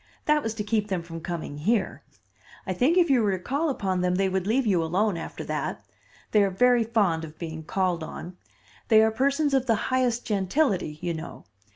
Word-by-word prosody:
That 300 0 +3
was 225 -4 -3
to 210 - -3
keep 210 0 0
them 185 -4 -2
from 165 -1 -8
coming 160 -4 -5
here. 205 +4 0 0.6
I 185 - -2
think 265 - +2
if 345 -5 +4
you 255 -3 +4
were 200 -3 +1
to 180 - -14
call 295 +4 0
upon 190 -8 -1
them 180 0 +1
they 190 +1 +1
would 190 0 -1
leave 250 +4 +2
you 185 -6 +2
alone 190 +5 +1
after 165 - -6
that. - - -4 0.5
They 210 - +5
are 200 - +3
very 245 +5 +3
fond 205 -8 +1
of 155 -1 -9
being 160 -2 -6
called 180 0 -1
on. 175 +2 -8 0.5
They 220 -1 +6
are 220 - +3
persons 280 +5 +1
of 265 -1 +2
the 225 - +4 0.2
highest 245 -2 +1
gentility, 195 - 0
you 175 -1 -1
know. 160 +1 -8
200 Hz, 210 wpm, -26 LUFS, 175-245 Hz, 0.6 s, They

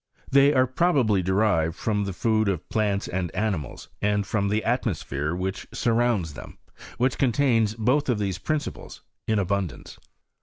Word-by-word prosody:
They" 140 +1 +6
Are 130 -3 +4
probably 130 - +2
derived' 95 -4 +1
from 105 -1 -1
the 100 - -3
food 110 +3 +1
of 90 -4 -2
plants 105 -2 0
and 90 -1 -2
animals, 95 - -3
and 105 0 +1
from 100 -1 0
the 105 +2 0
atmosphere 85 - -1
which 95 +1 -4
surrounds 115 -8 +1
them, - - -10 0.2
and - - -15
which 125 +1 0
contains 115 -4 +2
both 130 +6 +1
of 120 - +2
these 100 -3 -2
principles 155 -1 -4 0.2
m 110 - +2
abundance. 100 -6 -3
105 Hz, 155 wpm, -25 LUFS, 95-120 Hz, 0.2 s, They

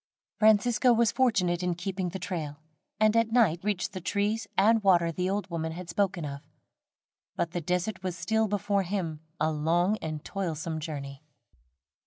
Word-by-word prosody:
Francisco 225 +3 +4
was 230 -1 +3
fortunate 185 -9 +2
in 180 -1 0
keeping 185 +1 -3
the 185 - -5
trail, 165 -5 -4 0.4
and 215 0 +4
at 230 -1 +3
night 220 -9 +4
reached 205 -3 -1
the 185 - -5
trees 205 +3 -1
and 220 +3 +5
water 175 -4 +4
the 180 +3 -1
old 200 -1 -1
woman 160 -1 -2
had 175 0 -8
spoken 185 -3 0
of, 140 -1 -6 0.9
but 170 - -1
the 175 - -3
desert 180 +5 -1
was 185 -2 -4
still 220 +6 +1
before 200 0 0
him 175 -5 -3 0.2
a 160 - +2
long 170 +7 +1
and 155 -1 -5
toilsome 165 -4 -3
journey. 140 -3 -6
180 Hz, 165 wpm, -28 LUFS, 165-205 Hz, 0.9 s, and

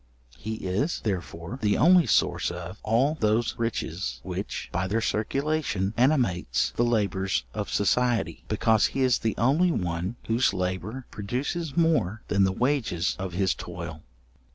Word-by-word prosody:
He 110 +1 -4
is, 105 - -1
therefore, 90 +2 -4
the 105 -2 +2
only 175 +1 +6
source - - +2
of 90 +2 -7
all 120 +7 +2
those 110 +2 +1
riches 110 - -2
which, - - -4
by 90 +2 -1
their 110 +4 0
circulation, 115 -2 -1
animates 125 - +2
the 120 - +2
labours 95 - +1
of - - -3
society: 120 +3 +1
because 110 0 +3
he - - +1
is 130 -3 +3
the 110 - -1
only 145 +10 +3
one 90 - -2
whose 115 +3 +2
labour 95 +7 -3
produces 135 - -3
more 115 - +2
than 100 -1 +4
the 95 - +1
wages 115 - 0
of 95 -1 -4
his 95 0 +1
toil. 85 -3 -7
110 Hz, 145 wpm, -26 LUFS, 95-125 Hz, -, only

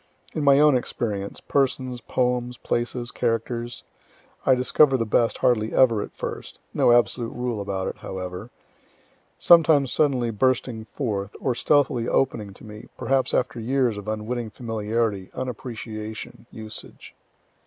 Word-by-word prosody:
In 155 - -2
my 140 -1 +6
own 150 -2 +6
experience, 105 -5 -3
(persons, 130 -3 0
poems, 125 0 -1
places, 120 +1 -2
characters,) 120 0 -2 0.6
I 130 - +6
discover 130 +2 +4
the 115 - -1
best 115 +2 +2
hardly 110 -3 +1
ever 115 -5 +4
at - - -7
first, - - -6 0.2
(no - - +4
absolute 120 0 +2
rule 125 -4 -2
about 95 -1 -3
it, - - -5
however,) 95 +3 -6 0.9
sometimes 155 -6 +5
suddenly 130 -6 +2
bursting 125 0 0
forth, 105 -5 -3
or 130 - 0
stealthily 130 -2 +2
opening 110 -7 0
to - - -16
me, 105 0 -10
perhaps 135 0 +1
after 125 -1 0
years 125 0 +1
of 105 0 -8
unwitting 110 +2 -3
familiarity, 110 -3 -2
unappreciation, 115 -3 -6
usage. 110 -1 -9
120 Hz, 130 wpm, -24 LUFS, 110-130 Hz, 0.9 s, my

